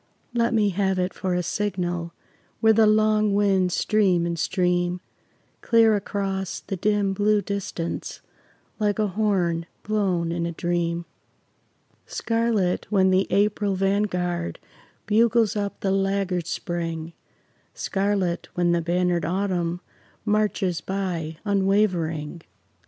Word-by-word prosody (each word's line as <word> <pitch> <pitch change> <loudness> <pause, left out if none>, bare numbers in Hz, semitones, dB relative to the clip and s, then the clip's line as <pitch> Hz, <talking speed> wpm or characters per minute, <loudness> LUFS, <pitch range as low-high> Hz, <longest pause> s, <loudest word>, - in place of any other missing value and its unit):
Let 235 -1 +2
me 210 -2 +3
have 190 0 0
it 180 0 -1
for 185 -1 -2
a 180 - 0
signal, 175 -3 -2 0.5
Where 220 0 +5
the 220 0 +5
long 215 -1 +3
winds 190 -3 +2
stream 190 -6 +2
and 170 -1 -2
stream, 180 +1 0 0.6
Clear 225 -2 +4
across 195 -1 -3
the 195 - -4
dim 205 +1 +1
blue 210 +2 +2
distance, 195 -4 -4 0.6
Like 205 -1 +1
a 215 -2 +1
horn 180 -5 0 0.2
blown 190 -6 0
in 170 0 -1
a - - -3
dream; 170 0 -1 1.0
Scarlet 225 -6 0
when 190 -2 +3
the 185 +1 +3
April 205 -1 +1
vanguard 180 - 0 0.5
Bugles 225 0 +3
up 200 -1 -3
the 195 - 0
laggard 195 -3 0
Spring, 165 -2 -4 0.6
Scarlet 195 -3 -1
when 175 -1 +2
the 170 0 +2
bannered 175 0 +1
Autumn, 180 -1 -1 0.4
Marches 210 -4 0
by 175 -5 -3
unwavering. 185 -6 0
190 Hz, 120 wpm, -24 LUFS, 175-205 Hz, 1.0 s, Where